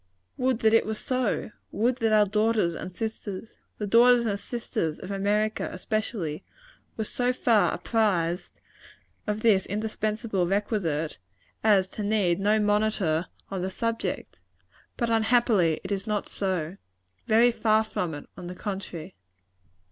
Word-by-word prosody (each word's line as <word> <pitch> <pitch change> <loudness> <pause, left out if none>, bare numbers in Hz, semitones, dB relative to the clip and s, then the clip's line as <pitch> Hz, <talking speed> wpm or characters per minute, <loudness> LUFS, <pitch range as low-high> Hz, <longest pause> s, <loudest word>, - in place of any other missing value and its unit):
Would 255 -2 0
that 220 0 +4
it 225 - +4
were 220 - -1
so! 255 -2 -1 0.2
Would 240 +3 +1
that 225 -3 +1
our 210 -1 +6
daughters 210 -3 +1
and 185 - -6
sisters 220 +1 -6 0.2
the 210 - -3
daughters 235 +3 +5
and 200 -2 -1
sisters 185 -9 -3
of 185 - -8
America, 205 +2 0
especially 185 -5 -3 0.5
were 220 - 0
so 245 +3 0
far 230 -4 +3
apprized 185 -6 0 0.7
of 210 +1 -1
this 210 -4 +3
indispensable 215 -2 -1
requisite, 180 - -1 0.4
as 200 -4 +4
to 215 - -6
need 200 -4 +1
no 210 +2 +3
monitor 205 -6 +1 0.2
on 190 -2 -2
the 185 - -1
subject! 230 +4 -3 0.6
But, 235 -2 0
unhappily, 220 -7 +3
it - - -6
is 195 +1 -2
not 210 -1 -1
so. 185 -2 -2 0.5
Very 230 +3 +5
far 220 -1 +3
from 180 -7 -3
it, 145 - -9
on 175 - -8
the 180 - -6
contrary. 185 -3 -6
210 Hz, 140 wpm, -27 LUFS, 185-225 Hz, 0.7 s, our